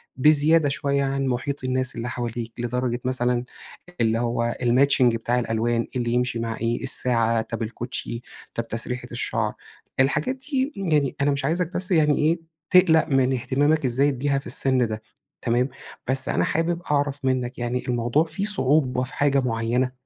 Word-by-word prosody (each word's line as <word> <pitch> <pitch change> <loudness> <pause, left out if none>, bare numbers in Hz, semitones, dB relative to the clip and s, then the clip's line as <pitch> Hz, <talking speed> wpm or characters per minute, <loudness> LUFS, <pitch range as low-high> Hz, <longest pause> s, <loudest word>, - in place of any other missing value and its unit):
بزيادة 150 +2 +4
شُويّة 140 0 0
عن 135 0 -1
مُحيط 130 +2 -2
الناس 130 0 -1
اللي 115 +1 -4
حواليك، 120 -2 -4
لدرجة 120 0 -1
مثلًا 125 -1 0 0.6
اللي 115 0 +2
هو 120 0 -1
الماتشينج 125 0 +4
بتاع 120 +2 0
الألوان، 115 0 0
إيه 125 - 0
اللي 120 0 -1
يمشي 125 -1 0
مع 115 -1 -3
إيه، 115 +3 -2
الساعة، 115 -3 +2
طب 115 +1 -5
الكوتشي، 115 +1 -5 0.3
طب 115 0 -3
تسريحة 125 +2 -3
الشعر. - - -1 0.5
الحاجات 140 - +2
دي، 265 +1 -2
يعني 150 -8 +1
أنا 145 +1 +3
مش 140 -1 -2
عايزك 170 +3 0
بس 185 +1 0
يعني 150 -4 +4
إيه، 160 +3 +2 0.3
تقلّق 170 -4 +5
من 135 -2 +2
اهتمامك 140 +4 +1
الزايد 130 +1 +1
بيها 140 0 +1
في - - -15
السن 130 -3 +2
ده، 110 0 -5 0.4
تمام، 125 +3 +1 0.4
بس 130 0 +1
أنا - - +1
حابب 170 +2 -1
أعرف 140 -1 0
منّك، 125 -1 -1
يعني 120 +1 -2
الموضوع 120 +4 +1
فيه 160 +5 -5
صعوبة 140 -9 +2
في 130 +3 -8
حاجة 140 -1 +2
معيّنة؟ 120 +1 0
130 Hz, 165 wpm, -24 LUFS, 120-145 Hz, 0.6 s, تقلّق